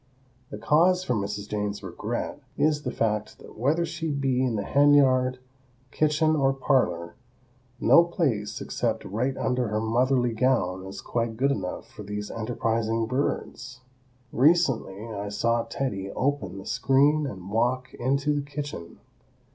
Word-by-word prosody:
The - - -7
cause 180 +5 +3
for 125 - -1
Mrs. 105 -1 -3
Jane's 105 -1 -3
regret 110 +9 -4 0.2
is 150 -1 +2
the 130 - -3
fact 105 -1 -1
that - - -14
whether 150 +9 +1
she 165 -1 -4
be 135 -3 0
in 125 -3 0
the 100 - -1
hen 145 +5 +4
yard, 130 -2 +3 0.5
kitchen 155 +1 +2
or 135 -2 +2
parlor, 90 -11 0 0.7
no 170 - +6
place 135 - -1
except - - -2
right 125 +7 -2
under 125 -1 0
her 105 0 -1
motherly 120 +2 +1
gown 110 -7 +1
is 95 - -8
quite 115 -2 -2
good 135 +3 +2
enough 95 -8 -4
for - - -12
these 105 0 -5
enterprising 115 0 -1
birds. 130 +1 -3 0.5
Recently 135 - +2
I 100 0 -4
saw 115 +3 0
"Teddy" 115 -5 -3
open 140 -4 -2
the 95 - -9
screen 145 +3 +2
and 95 -5 -8
walk 125 +3 0
into 140 +4 0
the 145 - 0
kitchen. 145 - -7
125 Hz, 145 wpm, -26 LUFS, 105-140 Hz, 0.7 s, no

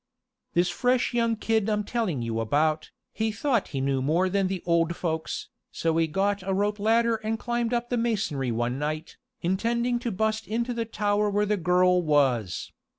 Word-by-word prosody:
"This 175 +1 +3
fresh 250 +5 +1
young 230 -1 +2
kid 220 -1 0
I'm 210 -1 +1
telling 200 - -1
you 115 -1 -2
about, 155 +7 +1 0.2
he 220 0 -1
thought 235 0 0
he 135 - -4
knew 135 0 0
more 165 +7 +2
than 195 0 +1
the 185 -1 -4
old 170 0 +2
folks, 160 -2 -3 0.2
so 165 -1 0
he 165 -1 +3
got 195 +5 0
a 190 +1 -1
rope 205 +1 0
ladder 230 +2 +3
and 220 +1 -2
climbed 240 0 -1
up 240 0 -1
the 245 - 0
masonry 210 - -1
one 120 +3 -1
night, 155 +2 -4 0.3
intending 235 +7 0
to 240 -1 -3
bust 220 +1 -1
into 235 +4 -1
the 230 -1 -2
tower 210 -1 0
where 205 +1 +1
the 210 +1 +1
girl 180 0 +3
was. 135 - +1
200 Hz, 185 wpm, -26 LUFS, 160-225 Hz, 0.3 s, This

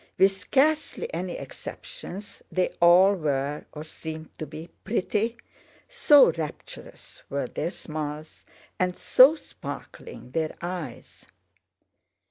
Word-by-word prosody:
With 195 +1 +6
scarcely 310 - +1
any - - -3
exceptions 210 - -9
they 185 -1 +1
all 180 +3 +7
were, 145 -4 -2
or 150 - -7
seemed 160 0 -8
to 155 - -4
be, 160 +2 -9
pretty—so 235 - +2
rapturous 155 -3 -8
were 140 -1 -1
their 155 +6 -3
smiles 155 -2 -6 0.4
and 180 -1 0
so 270 +5 +7
sparkling 325 - -9
their 160 +2 -1
eyes. 175 -8 -7
175 Hz, 100 wpm, -26 LUFS, 155-225 Hz, 0.4 s, all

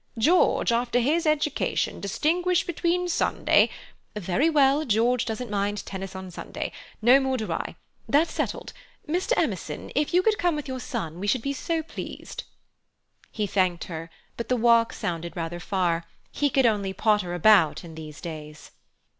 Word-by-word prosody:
George, 310 +1 +3
after 235 +1 +1
his 310 +7 +2
education, 305 -1 0
distinguish 345 - +1
between 350 +1 0
Sunday—" 350 - +3 0.5
"Very 210 - +1
well, 285 -1 +4
George 235 0 +2
doesn't 225 0 -4
mind 205 0 -1
tennis 190 0 -6
on 190 -1 -7
Sunday. - - -5 0.3
No 250 +4 +7
more 265 -1 0
do 220 -3 -4
I. - - -3 0.3
That's 305 +4 +3
settled. - - -3 0.3
Mr. 360 +9 0
Emerson, - - -2
if 295 - 0
you 360 +1 +4
could 430 0 +2
come 350 -2 +2
with 295 -2 -5
your 260 -1 -4
son 165 -7 -5
we 200 - -3
should 230 +2 +1
be 280 - -1
so 325 +3 -2
pleased." 325 - -7 0.9
He 215 - -1
thanked 185 -3 +1
her, 165 -1 -7 0.3
but 235 - -5
the 250 - +2
walk 230 0 +4
sounded 170 -4 -4
rather 170 +1 -3
far; 170 -2 0 0.3
he 290 - +1
could 265 -1 +3
only 205 -4 +1
potter 205 -4 +1
about 175 -3 +4
in 165 -2 -10
these 155 -2 -9
days. 155 -3 -8
230 Hz, 165 wpm, -26 LUFS, 185-295 Hz, 0.9 s, No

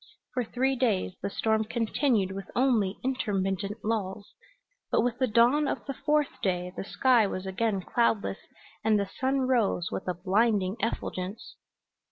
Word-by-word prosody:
For 250 -3 0
three 260 +4 0
days 225 -8 +1
the - - -2
storm 220 +2 +1
continued 225 -2 0
with 195 0 -7
only 230 -7 +2
intermittent 205 -4 -2
lulls, 210 -2 -2 0.6
but - - +3
with 245 +1 -1
the 260 - +3
dawn 245 +7 +4
of - - -3
the 275 - -3
fourth 300 +2 0
day 180 -3 -1
the - - -4
sky 240 +1 +3
was 185 -1 -4
again 195 +1 0
cloudless, 225 -1 0 0.4
and 215 -1 +3
the 200 - 0
sun 265 +1 +1
rose 235 -9 +1
with - - -4
a 180 - -1
blinding 195 +1 +1
effulgence. 195 -2 -4
220 Hz, 155 wpm, -28 LUFS, 195-250 Hz, 0.6 s, dawn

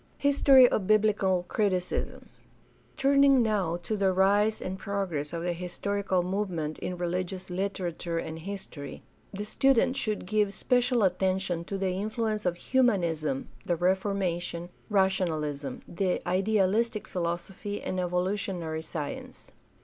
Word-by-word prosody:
History 275 -2 +6
of 195 -5 -1
biblical 205 -4 +3
criticism. 185 -4 -1 0.3
— - - -33
Turning 275 -2 +5
now 195 -6 0
to 215 - -2
the 195 -2 +2
rise 205 +3 +3
and 190 +1 -5
progress 185 -8 -3
of 170 -1 -4
the 175 0 0
historical 185 +2 -1
movement 180 -5 -2
in 180 - -4
religious 180 +1 -3
literature 180 -3 -3
and 160 -1 -4
history, 165 -6 -7 0.3
the 205 +1 -5
student 265 +2 +3
should 215 -8 -2
give 205 0 +1
special 245 -2 +2
attention 185 -2 0
to 195 - -4
the 190 -1 0
influ 220 +3 -1
ence 210 -3 -2
of 175 -1 0
Humanism, 170 - +1
the 175 - 0
Reformation, 175 -1 -1 0.2
rationalism, 160 -9 0
the 180 +1 0
idealistic 205 +3 +1
philosophy, 180 +4 -3
and 185 - -3
evolutionary 180 -2 -1
science. 155 -2 -7
190 Hz, 125 wpm, -28 LUFS, 175-210 Hz, 0.3 s, History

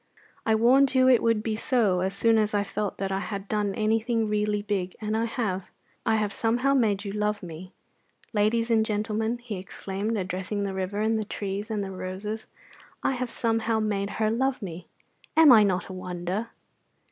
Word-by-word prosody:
I 220 - +4
warned 265 +5 +4
you 255 0 +5
it 250 -3 +6
would 230 -2 +2
be 220 -1 -1
so 220 -6 +2
as 190 +2 -1
soon 225 +2 +4
as 215 -1 +1
I 205 - +2
felt 205 0 -3
that 195 0 -2
I 190 - 0
had 200 0 -5
done 205 -2 -1
anything 225 +1 +1
really 210 0 0
big, 190 -3 -2
and 215 0 -2
I 225 +1 +1
have. 215 -6 -2 0.4
I 220 - +4
have 210 -2 0
somehow 245 +4 +1
made 210 -6 +2
you 200 - -3
love 210 0 -1
me. 175 +2 -8 0.6
Ladies 225 +2 +2
and 220 -1 +4
gentlemen," 220 +2 -1
he 240 -4 -6
exclaimed, 195 +3 -4
addressing 190 +2 -3
the 195 -1 -2
river 190 +2 -2
and 220 0 +1
the - - -1
trees 205 +1 -4
and 210 -2 -1
the 195 - -5
roses, 195 +4 -5 0.6
"I - - +2
have 255 -1 -2
somehow 225 -1 0
made 200 -2 -1
her 215 -1 +2
love 265 +3 0
me! 180 -5 -7 0.5
Am 320 -3 +9
I 225 -3 +9
not 190 -3 +1
a 190 - -7
wonder?" 185 +4 -4
210 Hz, 195 wpm, -26 LUFS, 195-225 Hz, 0.6 s, Am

